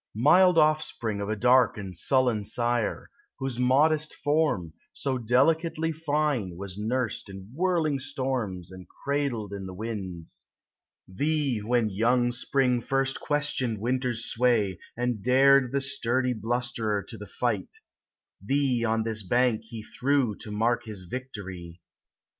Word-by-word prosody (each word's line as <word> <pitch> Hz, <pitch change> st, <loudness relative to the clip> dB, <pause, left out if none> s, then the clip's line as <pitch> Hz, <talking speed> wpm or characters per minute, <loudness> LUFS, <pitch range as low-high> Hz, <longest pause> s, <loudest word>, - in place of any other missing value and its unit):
Mild 175 Hz, -, +5 dB
offspring 150 Hz, -9 st, +1 dB
of 100 Hz, -, -3 dB
a 110 Hz, -, 0 dB
dark 125 Hz, +2 st, +4 dB
and 95 Hz, -3 st, -7 dB
sullen 125 Hz, +2 st, +2 dB
sire, 120 Hz, +1 st, -1 dB, 0.3 s
Whose 135 Hz, -3 st, -4 dB
modest 150 Hz, +5 st, +3 dB
form, 145 Hz, -, 0 dB, 0.2 s
so 130 Hz, -2 st, -2 dB
delicately 160 Hz, +7 st, +2 dB
fine, 145 Hz, -, -1 dB
Was 95 Hz, -1 st, -7 dB
nursed 110 Hz, +1 st, -2 dB
in 95 Hz, +2 st, -10 dB
whirling 165 Hz, -3 st, +1 dB
storms 125 Hz, -10 st, -3 dB
And 95 Hz, -1 st, -11 dB
cradled 140 Hz, -8 st, -2 dB
in 95 Hz, -1 st, -5 dB
the 95 Hz, -, -8 dB
winds; 95 Hz, -, -6 dB, 0.6 s
Thee, 140 Hz, +4 st, 0 dB
when 110 Hz, 0 st, +1 dB
young 120 Hz, +4 st, +2 dB
Spring 125 Hz, 0 st, +1 dB
firsl 135 Hz, +1 st, 0 dB
questioned 145 Hz, -6 st, -1 dB
Win 120 Hz, +5 st, 0 dB
ter's 120 Hz, -3 st, -3 dB
sway, 115 Hz, -7 st, +1 dB, 0.2 s
And 120 Hz, -3 st, -1 dB
dared 130 Hz, +2 st, +5 dB
the 140 Hz, 0 st, 0 dB
sturdy 130 Hz, -1 st, 0 dB
blusterer 115 Hz, -2 st, -2 dB
to 120 Hz, -, -10 dB
the 105 Hz, -1 st, -9 dB
fight, -, -, -2 dB, 0.7 s
Thee 135 Hz, 0 st, +1 dB
on 110 Hz, -1 st, +1 dB
this 110 Hz, -1 st, -3 dB
bank 120 Hz, +2 st, +1 dB
he 110 Hz, -1 st, -8 dB
threw 130 Hz, -1 st, 0 dB
To -, -, -10 dB
mark 115 Hz, +3 st, 0 dB
his 105 Hz, -4 st, -7 dB
victory. 90 Hz, -6 st, -7 dB
120 Hz, 135 wpm, -27 LUFS, 105-135 Hz, 0.7 s, Mild